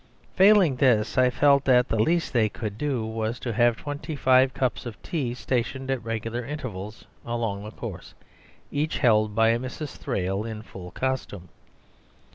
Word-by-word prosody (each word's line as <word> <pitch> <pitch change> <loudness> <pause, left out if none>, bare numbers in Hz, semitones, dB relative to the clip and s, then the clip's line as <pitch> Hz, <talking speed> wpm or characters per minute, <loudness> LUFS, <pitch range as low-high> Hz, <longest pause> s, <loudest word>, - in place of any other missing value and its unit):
Failing 190 -8 +5
this, 120 -6 +2
I 130 -1 +4
felt 140 +1 +4
that 125 -2 +4
the 110 - 0
least 165 +8 +1
they 110 -3 +3
could 105 -1 -5
do 130 -3 -2
was 110 +1 -3
to 120 - -3
have 120 +1 +3
twenty 145 +2 -5
five 130 -1 +4
cups 130 -1 -2
of 110 -6 -8
tea 130 -8 -2
stationed 130 +1 -2
at 130 -3 -2
regular 115 +1 -3
intervals 115 -7 -7 0.2
along 115 -4 -3
the 105 - -7
course, - - -8 0.6
each 150 +2 -1
held 110 -5 +3
by 115 0 +4
a 115 +1 +2
Mrs. 130 +4 -6
Thrale 95 -5 -2
in 110 -1 -6
full 90 -5 -10
costume. 105 -7 -4
120 Hz, 165 wpm, -25 LUFS, 110-135 Hz, 0.6 s, Failing